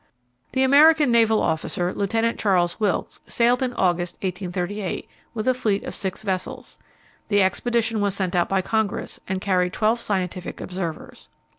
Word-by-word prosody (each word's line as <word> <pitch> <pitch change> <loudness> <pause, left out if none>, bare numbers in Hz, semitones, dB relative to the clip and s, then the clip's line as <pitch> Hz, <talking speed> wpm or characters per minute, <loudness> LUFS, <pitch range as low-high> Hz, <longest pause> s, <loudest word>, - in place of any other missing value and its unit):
The 260 - +2
American 295 +1 +6
naval 225 -2 +4
officer, 175 +2 -1
Lieutenant 225 +3 0
Charles 180 -3 +1
Wilkes, 210 -4 -1
sailed 240 +2 +2
in 255 -1 0
August, 175 -5 0
1838, 185 +1 -3 0.3
with 220 +2 -3
a 255 - +5
fleet 215 -5 -1
of - - -6
six 190 0 -2
vessels. 190 -3 -4 0.5
The 205 -2 +3
expedition 225 +2 0
was 200 -1 +1
sent 185 -2 -1
out 175 - +2
by 190 -1 +1
Congress, 220 -1 -2
and 190 0 -2
carried 185 -2 0
twelve 225 +2 +1
scientific 185 -5 -3
observers. 180 -4 -6
200 Hz, 150 wpm, -23 LUFS, 180-230 Hz, 0.5 s, American